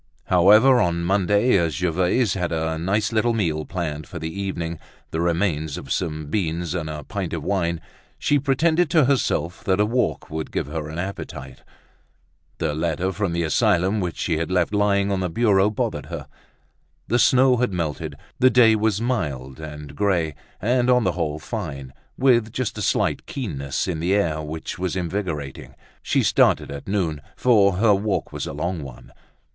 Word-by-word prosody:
However, 105 +9 +6
on 85 -2 0
Monday, 100 +6 +2
as 85 -4 0
Gervaise 90 - +1
had 90 -3 -2
a 80 0 -1
nice 100 +6 0
little 115 +1 +2
meal 80 -8 -1
planned 80 -4 -4
for 90 - -8
the 80 0 -5
evening, 85 -4 -3 0.3
the 80 - -1
remains 80 -3 0
of 70 - -8
some 80 -4 -2
beans 85 0 -2
and 80 -3 -3
a 75 -1 -6
pint 95 -4 -4
of 80 -3 -3
wine, 85 -3 0 0.4
she 145 - +2
pretended 160 +5 +2
to 155 -5 +4
herself 90 - 0
that 95 0 +2
a 105 - +4
walk 120 -4 -1
would 80 0 -4
give - - -1
her 75 +1 -5
an 80 - -7
appetite. 70 -8 -6 1.0
The 80 -2 -1
letter 85 +4 -1
from 100 -2 -2
the 85 0 -1
asylum 95 +3 +2
which 90 -3 -3
she 80 -3 0
had 85 +2 -2
left 90 +1 +1
lying 100 -1 +2
on 95 - 0
the 90 -1 -1
bureau 100 +1 +3
bothered 105 - -3
her. - - -6 0.8
The 120 - +2
snow 130 0 +5
had 125 -2 +1
melted, 80 -4 -3 0.2
the 130 - +6
day 115 -3 +6
was 105 -1 +1
mild 75 - -2
and 75 -2 -8
grey 90 -6 +1 0.3
and 125 +3 +1
on 125 -1 +4
the 95 - +2
whole 80 -4 -2
fine, 75 - -6 0.2
with 120 -4 +3
just 125 0 -2
a 105 - -5
slight - - 0
keenness 70 - -3
in 85 -4 -2
the 90 +4 +1
air 80 -7 0
which 80 +3 -6
was 90 -1 -2
invigorating. 85 -6 -4 0.3
She - - +1
started - - +3
at 70 0 -8
noon, 85 -7 -1
for 105 -6 +4
her 105 +3 +4
walk 100 +1 -1
was - - -4
a - - -5
long 85 +3 -3
one. 60 -2 -11
90 Hz, 180 wpm, -23 LUFS, 80-105 Hz, 1.0 s, However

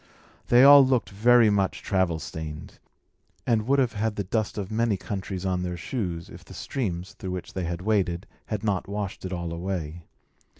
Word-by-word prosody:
They 120 +1 +6
all 140 0 +10
looked 130 -4 +1
very 115 +2 +5
much 100 -2 0
travel 95 -4 +1
stained, 75 0 -7 0.7
and 110 -2 +1
would 140 +1 +3
have 125 -4 +2
had 110 0 -1
the 100 - -2
dust 110 +3 -2
of 100 0 -4
many 110 -2 +1
countries 95 -1 -5
on 90 -1 0
their 90 -1 -3
shoes, 85 -4 -4
if - - -12
the - - -13
streams, 95 -9 -4
through 95 - -7
which 90 -1 -5
they 90 -2 -3
waded, 95 -1 0 0.2
had 105 -2 -3
not 100 -3 -1
washed 100 -2 -4
it 95 - -4
all 85 -2 -3
away. 85 -2 -4
95 Hz, 180 wpm, -26 LUFS, 90-110 Hz, 0.7 s, all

